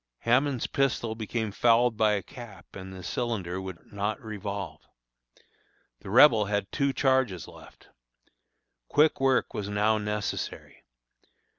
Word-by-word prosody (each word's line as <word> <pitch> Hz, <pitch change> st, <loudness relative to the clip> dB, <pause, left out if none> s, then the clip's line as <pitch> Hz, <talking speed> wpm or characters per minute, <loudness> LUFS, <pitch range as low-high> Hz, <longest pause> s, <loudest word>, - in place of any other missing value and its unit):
Hammond's 130 Hz, +2 st, +2 dB
pistol 130 Hz, -4 st, 0 dB
became 110 Hz, 0 st, -3 dB
fouled 120 Hz, +2 st, +3 dB
by 105 Hz, -1 st, +3 dB
a 100 Hz, -, -1 dB
cap, 120 Hz, -9 st, -12 dB
and 95 Hz, -1 st, -8 dB
the 95 Hz, -1 st, -9 dB
cylinder 95 Hz, -5 st, -3 dB
would 95 Hz, -1 st, -10 dB
not 105 Hz, +1 st, -2 dB
revolve. 100 Hz, -3 st, -6 dB, 1.2 s
The -, -, -10 dB
Rebel 115 Hz, -1 st, +6 dB
had 100 Hz, -1 st, -2 dB
two 140 Hz, -1 st, +1 dB
charges 130 Hz, -, +1 dB
left. -, -, -16 dB, 1.0 s
Quick 150 Hz, +1 st, +3 dB
work 135 Hz, -1 st, +2 dB
was 100 Hz, -1 st, -4 dB
now 105 Hz, +2 st, +2 dB
necessary. 105 Hz, -1 st, -4 dB
110 Hz, 125 wpm, -27 LUFS, 100-125 Hz, 1.2 s, Rebel